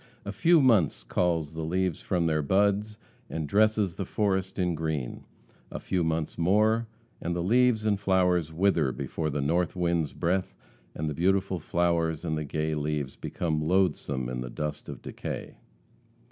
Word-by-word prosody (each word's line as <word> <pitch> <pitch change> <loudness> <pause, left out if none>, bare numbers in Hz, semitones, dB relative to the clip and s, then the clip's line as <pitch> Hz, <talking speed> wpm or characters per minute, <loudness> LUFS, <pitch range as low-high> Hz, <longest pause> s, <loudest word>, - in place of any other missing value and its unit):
A 100 - -3
few 165 - +4
months 90 - +3
calls 80 +3 0
the 80 - -4
leaves 90 +1 -1
from 90 -3 0
their 80 -1 +1
buds, 100 +6 +1 0.3
and 80 -2 -3
dresses 105 0 +2
the 95 - -4
forest 95 -1 -1
in 90 -2 +1
green 80 -5 -3 0.4
a - - -6
few 90 -2 -1
months 80 0 -2
more 110 +6 +3 0.3
and 85 +1 -2
the 85 - -1
leaves 115 +2 +3
and 105 -2 +2
flowers 90 -4 +2
wither 80 -5 +2
before 80 +4 -3
the 75 0 -2
North 85 +6 0
wind's 85 -5 0
breath 90 +2 -1 0.4
and 80 - -3
the 75 - -2
beautiful 95 +3 +1
flowers 85 -1 0
and 80 -2 -1
the 75 - -2
gay 75 +2 -2
leaves 75 -2 -2
become 80 -3 -2
loathesome 75 -7 +1
in 60 0 -4
the 60 - -5
dust 75 +4 -5
of - - -8
decay. - - -6
85 Hz, 165 wpm, -28 LUFS, 75-95 Hz, 0.4 s, few